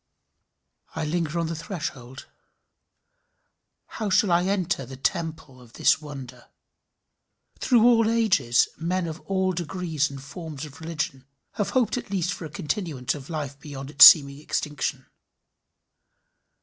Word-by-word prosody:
I - - -2
linger 165 +1 -2
on 170 - 0
the 165 +1 -4
threshold. 155 -7 -7 1.6
How 215 -2 -5
shall 190 0 +3
I 175 +1 +3
enter 190 -6 -1
the 130 +1 -10
temple 150 -2 -3
of 120 -2 -18
this - - +3
wonder? 140 -4 -10 1.1
Through 240 -3 +4
all 230 -2 +5
ages 210 - +3
men 180 +2 -1
of 160 0 -6
all 190 -1 +1
degrees 165 -3 -2
and 140 -1 -8
forms 150 +1 -8
of 150 +1 -13
religion 150 -5 -4 0.2
have 205 - -2
hoped 240 -2 +1
at 235 - -11
least 180 -2 -1
for 170 - -8
a - - -7
continuance 155 - -3
of 145 0 -10
life 145 -4 -5
beyond 140 -2 -8
its 140 -3 +10
seeming 140 -2 +6
extinction. 150 -3 -3
160 Hz, 135 wpm, -25 LUFS, 140-185 Hz, 1.6 s, its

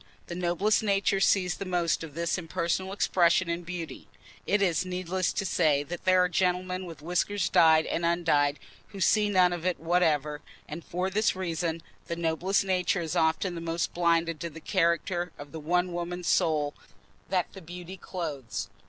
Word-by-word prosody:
The - - -7
noblest 180 +4 +1
nature 200 -2 +1
sees 185 -2 +2
the - - -4
most 175 -3 0
of 155 -3 -9
this 170 +2 -1
impersonal 170 +2 -2
expression 180 -2 +2
in 170 +1 -2
beauty 170 -2 -7 0.4
(it 205 - +3
is 180 -3 +2
needless 185 -1 -2
to 195 - -2
say 155 -5 +2
that 175 +5 -7
there 185 -1 +5
are - - +3
gentlemen 180 +1 -1
with 165 -3 -10
whiskers 180 +3 0
dyed 160 -1 +5
and 170 - -2
undyed 160 -4 +2 0.3
who 200 - -10
see 210 +3 +3
none 180 -3 +4
of 175 -2 -5
it 180 -1 0
whatever), 155 -4 +1 0.3
and 160 +3 -7
for 185 +2 -2
this 210 +1 +2
reason, 165 -2 -2 0.2
the 170 - -2
noblest 170 +4 0
nature 185 0 +1
is 160 -2 -3
often 160 +3 +1
the 170 - -6
most 165 0 -2
blinded 165 -2 +1
to 170 - -4
the 160 0 -10
character 175 0 0
of 145 0 -10
the 160 - -6
one 175 +3 0
woman's 175 +1 -4
soul 150 -2 +2 0.6
that 185 -2 0
the 195 - -10
beauty 175 +2 -8
clothes. 155 - -5
175 Hz, 180 wpm, -28 LUFS, 165-185 Hz, 0.6 s, there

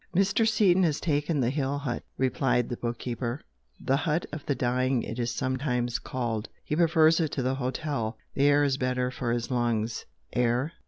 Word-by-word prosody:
"Mr. 195 +4 +3
Seaton 195 -4 +4
has 160 -5 +2
taken 150 -1 0
the 120 0 +1
hill 140 0 -1
hut" 140 -4 -3 0.2
replied 130 -2 +1
the 120 - -3
book 120 0 -3
keeper 120 +2 -3 0.4
"'The 135 - +1
hut 160 +2 0
of 150 -1 -6
the 140 - +1
dying' 125 0 +1
it 115 - -5
is 120 0 0
sometimes 125 -3 -1
called. 115 -4 -3 0.2
He 150 - -1
prefers 165 -1 +4
it 160 -3 0
to 130 - -1
the 130 +1 +1
hotel. 130 -3 -2 0.2
The 140 - +2
air 145 0 +5
is 135 -2 +1
better 125 -1 0
for 125 -2 -2
his 120 +1 -2
lungs." 120 -2 0 0.3
"Air? 125 +6 +1
130 Hz, 190 wpm, -28 LUFS, 120-150 Hz, 0.4 s, air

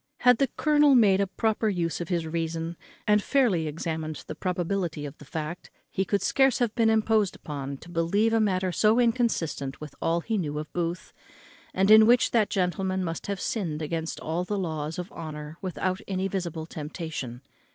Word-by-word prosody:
Had 250 -2 +5
the 275 - +3
colonel 295 -2 +5
made 200 -5 +5
a 200 - +1
proper 220 +2 0
use 175 -4 -1
of 170 - -5
his 170 -3 0
reason, 165 +1 -3 0.3
and 210 0 +4
fairly 205 - +2
examined 155 0 -4
the - - -5
probability 180 -4 -2
of 140 - -7
the 145 - -12
fact, 160 +4 -5 0.2
he 190 - 0
could 200 +1 0
scarce 270 -2 +3
have 240 -3 0
been 230 -2 +3
imposed 220 -2 +2
upon 140 -2 -6
to 165 - -14
believe 175 +7 +1
a 225 - +4
matter 185 -3 +1
so 215 +6 +3
inconsistent 225 - 0
with 150 -2 -8
all 170 +1 +1
he 220 +3 -1
knew 150 -4 -3
of 150 0 -6
Booth, 175 0 -3 0.6
and 195 -7 +2
in 220 0 +9
which 245 +1 +4
that 220 -3 +3
gentleman 190 0 0
must 165 +1 -4
have 200 -1 -2
sinned 165 -9 -2
against 160 +1 -3
all 165 +3 -2
the 205 +3 -2
laws 160 -4 -3
of 180 0 -5
honour 155 -1 -7
without 185 0 -2
any 190 0 -1
visible 170 -5 -3
temptation. 150 -6 -6
180 Hz, 185 wpm, -27 LUFS, 160-210 Hz, 0.6 s, in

